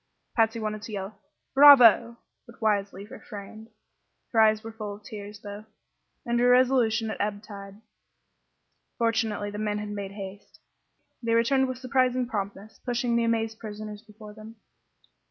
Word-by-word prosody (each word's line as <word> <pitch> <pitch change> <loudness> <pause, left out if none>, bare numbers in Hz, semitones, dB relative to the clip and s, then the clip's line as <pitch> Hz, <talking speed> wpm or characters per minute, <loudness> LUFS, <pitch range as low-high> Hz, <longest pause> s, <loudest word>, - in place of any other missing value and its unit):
Patsy 225 0 +2
wanted 215 -1 -4
to 225 - -9
yell 195 +1 -6 0.3
"bravo!" 245 -5 +8 0.3
but 235 - -16
wisely 200 -2 -1
refrained. 215 +1 -10 0.6
Her 225 - +4
eyes 215 0 +4
were 225 - -7
full 215 -2 -6
of 205 - -17
tears, 210 0 -9
though, 205 +1 -9 0.6
and 235 -1 0
her 245 +1 +4
resolution 245 -3 +3
at - - -5
ebb 205 0 -2
tide. 200 -1 -11 1.2
Fortunately 220 -3 0
the 205 - -6
men 210 -1 -1
had 210 0 -5
made 200 -1 -6
haste. 200 0 -10 0.6
They 230 -1 +1
returned 265 +3 +3
with 255 -1 -4
surprising 255 -1 +1
promptness, 205 -1 -6
pushing 240 -1 -1
the 235 0 +2
amazed 225 -1 -1
prisoners 210 -1 -8
before 215 -1 -13
them. 215 +1 -12
220 Hz, 150 wpm, -26 LUFS, 205-235 Hz, 1.2 s, bravo